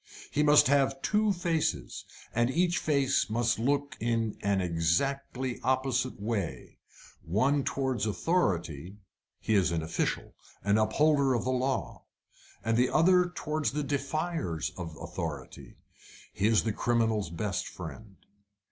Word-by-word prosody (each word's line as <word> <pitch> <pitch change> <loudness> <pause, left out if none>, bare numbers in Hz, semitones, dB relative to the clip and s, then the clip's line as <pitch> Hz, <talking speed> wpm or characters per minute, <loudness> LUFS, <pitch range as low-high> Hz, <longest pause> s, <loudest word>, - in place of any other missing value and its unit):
He 150 - +1
must 150 0 +6
have 135 0 +2
two 210 0 +2
faces, 165 - -1 0.3
and 120 +1 +2
each 175 +5 +1
face 140 - +1
must 115 +1 +1
look 140 +4 0
in 115 -1 0
an 100 -1 +1
exactly 120 +10 -1
opposite 130 -1 0
way. 100 - -4 0.4
The - - -17
one 135 +8 +2
towards 130 -6 -1
authority 95 - -1 0.4
he 110 - -1
is 95 -5 +3
an 80 -2 -1
official, 80 - -2 0.3
an 100 +2 +3
upholder 140 +4 +3
of 120 - -1
the 130 - 0
law; 130 +1 -2 0.6
the 115 +3 +2
other 180 +1 +4
towards 150 -5 -2
the 150 0 -1
defiers 140 - -2
of 80 -4 -7
authority 85 -6 -6 0.6
he 100 - +1
is 110 -1 +3
the 110 - -1
criminal's 115 -5 +1
best 95 +3 -3
friend. 110 -3 -9
120 Hz, 130 wpm, -29 LUFS, 100-140 Hz, 0.6 s, must